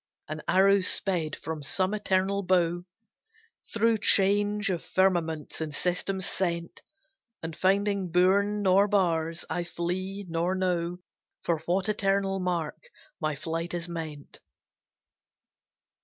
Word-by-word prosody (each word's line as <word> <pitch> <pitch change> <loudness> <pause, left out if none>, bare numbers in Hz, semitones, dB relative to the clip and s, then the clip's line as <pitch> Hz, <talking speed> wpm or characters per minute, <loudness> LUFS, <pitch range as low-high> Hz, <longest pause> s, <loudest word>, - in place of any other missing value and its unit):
An 155 0 -5
arrow 195 +1 +5
sped 175 -4 0
from 160 -1 -6
some 185 +7 -1
eternal 200 -1 +1
bow, 175 -2 +1 0.9
Through 225 0 +2
change 205 0 +3
of 175 -2 -3
firmaments 170 -5 0
and 155 -1 -3
systems 180 +4 -2
sent, 170 -2 -2 0.6
And 160 -1 -5
finding 200 0 +1
bourn 200 +4 +3
nor 195 +1 +5
bars, 165 -4 0
I 175 - -2
flee, 185 +3 -4
nor 170 +2 0
know 180 -2 -1 0.5
For 165 -2 0
what 185 +3 +1
eternal 195 -2 +1
mark 180 - -3 0.3
my 155 -3 -1
flight 165 +4 -3
is 170 0 -4
meant. 160 -4 -7
185 Hz, 115 wpm, -28 LUFS, 170-195 Hz, 0.9 s, arrow